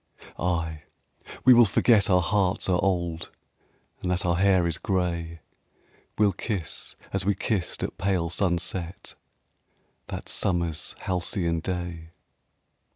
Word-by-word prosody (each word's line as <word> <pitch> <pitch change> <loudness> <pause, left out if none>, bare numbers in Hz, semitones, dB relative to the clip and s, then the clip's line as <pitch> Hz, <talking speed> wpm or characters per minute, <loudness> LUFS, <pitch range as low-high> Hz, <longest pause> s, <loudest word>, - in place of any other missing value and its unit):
Ay, 80 -3 -1 0.6
we 130 - +9
will 120 0 +8
forget 110 +1 +4
our 90 -2 +4
hearts 100 0 +1
are 90 -1 +2
old, 85 -3 -1 0.7
And 90 - -2
that 90 0 0
our 85 -1 +2
hair 95 -2 +4
is 85 -1 -2
gray. 85 -4 -2 0.8
We'll 105 -2 +4
kiss 95 -3 -4 0.2
as 95 -1 0
we 100 +1 +2
kissed 95 -1 -1
at - - -4
pale 90 -4 0
sunset 90 -1 -2 0.9
That - - -6
summer's 85 -4 -1
halcyon 90 -2 -1
day. 85 -2 -4
90 Hz, 120 wpm, -26 LUFS, 85-95 Hz, 0.9 s, we